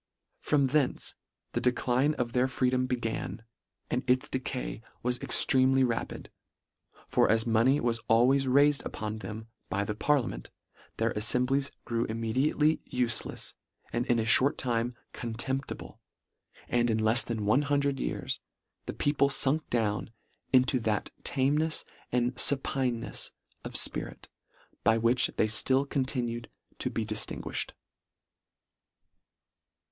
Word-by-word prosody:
From 140 -2 +2
thence 140 0 +1 0.4
the - - -2
de 125 - +3
cline 130 +5 +1
of 120 -1 -3
their 125 +1 +2
freedom 130 -1 0
began, 115 -2 -3 0.5
and 125 - 0
its 130 0 +2
decay 130 -3 -4 0.2
was 125 0 -1
extremely 130 0 +4
rapid; 120 -3 -3 0.8
for - - +2
as 110 0 +2
money 120 +5 +3
was 115 -1 0
al 115 +2 +5
ways 135 +1 +2
raifed 145 +2 +4
upon 110 0 -5
them 110 0 -7 0.2
by 100 +1 -1
the 105 - -3
parliament, 115 - -1 0.5
their 115 0 0
alfemblies 125 +5 +2 0.2
grew 115 -1 -1
immediately 130 +8 +1
ufelefs 120 -3 -1 0.4
and 120 +1 -1
in 120 - +2
a 115 - +1
fhort 130 +5 +4
time 120 -1 -1 0.2
contemptible; 120 +4 -4 0.7
and 120 0 +1
in 110 - +1
lefs 110 +3 +4
than 110 -3 -3
one 110 +7 +3
hundred 140 -1 0
years, - - -3 0.5
the - - -3
people 145 -1 +1
funk 140 +3 +1
down 110 -3 -1 0.4
into 130 0 +4
that 110 -2 -1
tamenefs 150 +4 0 0.3
and 125 +1 0
fupinenefs 130 -4 +1 0.3
of - - -7
fpirit - - 0 0.6
by 110 +1 +4
which 115 +2 +3
they - - +3
fUll 130 +5 +3
continue 125 -4 -2 0.4
to - - -1
be 115 - -3
dif 110 0 0
tinguiihed." - - -2
125 Hz, 130 wpm, -29 LUFS, 115-135 Hz, 0.8 s, al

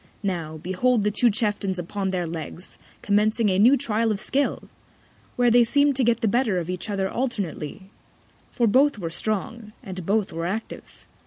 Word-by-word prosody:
Now, 165 -5 -3
behold 200 +8 +1
the 210 - +1
two 235 +4 +3
Chieftains 205 -3 -1
upon 190 +3 -3
their 180 -2 -1
Legs, 165 +2 -7 0.2
commencing 210 +2 +2
a 185 0 +1
new 250 +7 +6
Trial 230 -3 0
of 205 - -2
Skill! 280 +5 -1 0.7
where 245 -1 +3
they 240 +1 +6
seem'd 285 +3 +2
to 265 - +4
get 235 0 +2
the 225 - +2
better 230 -3 +1
of 175 0 -3
each 185 +4 -5
other 195 -2 -1
alternately; 195 - -4 0.6
for 240 - +1
both 265 +5 +3
were 170 -5 -5
strong, 215 +4 -3
and 185 -4 -7
both 205 +3 0
were 165 +1 -3
active. 220 +5 -7
210 Hz, 175 wpm, -24 LUFS, 185-235 Hz, 0.7 s, new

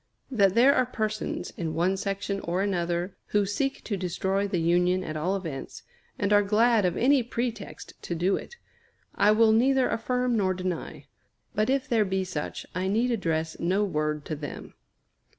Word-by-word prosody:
That 200 -6 +3
there 260 +4 +6
are 255 - +2
persons, 215 -3 -3
in 165 -2 -3
one 180 +3 +2
section 195 0 -3
or 180 +1 -1
another, 175 -1 -1
who 205 -1 +2
seek 270 +8 -2
to 210 - -2
destroy 190 +2 -1
the 195 -2 -1
Union 180 +2 +2
at 155 -3 -5
all 175 +6 0
events, 165 -8 -6 0.3
and 205 0 +1
are 205 - +6
glad 215 +1 +3
of 180 -1 0
any 270 +2 +4
pretext 230 -3 -5
to 170 - -4
do 180 +4 +1
it, 475 - -7 0.6
I 205 - +3
will 220 +1 +5
neither 260 +4 +3
affirm 250 +1 0
nor 190 -3 +1
deny. 180 -1 -4 0.5
But 215 +3 +1
if 270 0 +1
there 225 -3 +3
be 190 -1 -1
such, 175 -5 -5
I 185 +1 -1
need 230 +5 +1
address 165 -7 -1
no 190 +4 +1
word 150 -5 -1
to 155 - -3
them. 145 -1 -8
195 Hz, 175 wpm, -27 LUFS, 175-225 Hz, 0.6 s, there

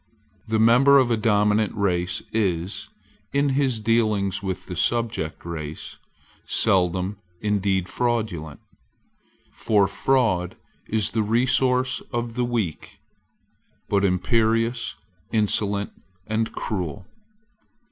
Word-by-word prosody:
The 110 0 +1
member 125 +5 +6
of 130 -3 +3
a - - +4
dominant 105 -1 +2
race 90 -3 0
is, 95 -4 -1 0.4
in 140 0 +2
his 135 -4 +1
dealings 105 -3 +1
with 95 -2 -4
the 90 - -6
subject 115 -6 -1
race, 80 -3 -6 0.5
seldom 95 +1 +1 0.2
indeed 100 -3 0
fraudulent, 110 -12 -2 0.9
for 105 -3 +2
fraud 100 -5 +1 0.3
is 110 -1 +1
the 110 - 0
resource 125 +3 +2
of 120 -1 -3
the 125 +1 0
weak, 115 -10 -3 0.9
but 100 -1 +2
imperious, 115 +5 +1 0.4
insolent, 105 -1 +1 0.3
and 110 +1 -1
cruel. 90 -5 -4
105 Hz, 100 wpm, -24 LUFS, 95-115 Hz, 0.9 s, member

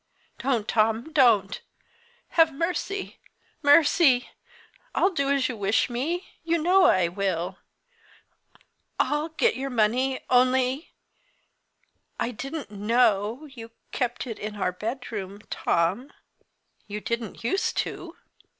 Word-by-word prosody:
"Don't, 245 -6 0
Tom, 225 +7 +1
Don't! 225 -8 +3 0.7
Have 325 -1 +4
mercy 360 +6 -3 0.4
mercy! 290 -3 +4 0.6
I'll 385 - +3
do 280 -6 -1
as 280 -2 +2
you 250 - -4
wish 205 +3 +1
me 325 +10 -2 0.2
you 335 +1 +1
know 365 +4 +4
I 185 - +4
will; 185 0 -2 1.4
I'll 295 +2 0
get 455 +9 +1
your 275 +1 -3
money. 250 +3 +1
Only 255 +3 +2 1.3
I 240 - -1
didn't 275 +3 -6
know 215 +3 +1
you 240 -6 -11 0.2
kept 245 -1 -2
it 230 -4 -6
in 210 0 -5
our 190 -3 -1
bedroom 210 -1 -5
Tom. 190 +12 0 0.8
You 210 +1 -5
didn't 235 -2 -4
use 385 +12 0
to." 345 0 -4
250 Hz, 115 wpm, -26 LUFS, 210-295 Hz, 1.4 s, Have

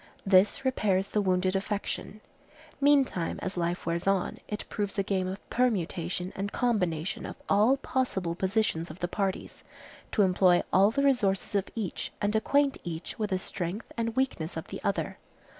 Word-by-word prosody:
This 195 +7 +4
repairs 200 -7 +1
the 210 - +1
wounded 185 -1 +1
affection. 205 +1 -3 0.6
Meantime, 275 - +3
as 190 - -2
life 175 0 -1
wears 170 +2 -1
on, 195 -2 +1
it 210 - -4
proves 205 -1 -3
a 195 - +2
game 190 -2 0
of 190 +2 -6
permutation 185 -6 0
and 200 +1 -3
combination 180 -8 0
of - - -6
all 215 +7 +4
possible 220 -11 -1
positions 190 -2 0
of 155 - -9
the 175 - -2
parties, 195 0 -3 0.5
to 210 - +4
employ 180 -1 +4
all 195 +2 +6
the 280 +5 0
resources 215 -10 +2
of 200 -1 0
each 215 -6 -3
and 205 +1 0
acquaint 280 +5 +2
each 165 +3 -6
with 210 -1 0
the 190 - +1
strength 185 +2 -4
and 230 -1 -2
weakness 225 -12 -1
of 160 - -6
the - - -6
other. - - -1
195 Hz, 165 wpm, -29 LUFS, 180-220 Hz, 0.6 s, all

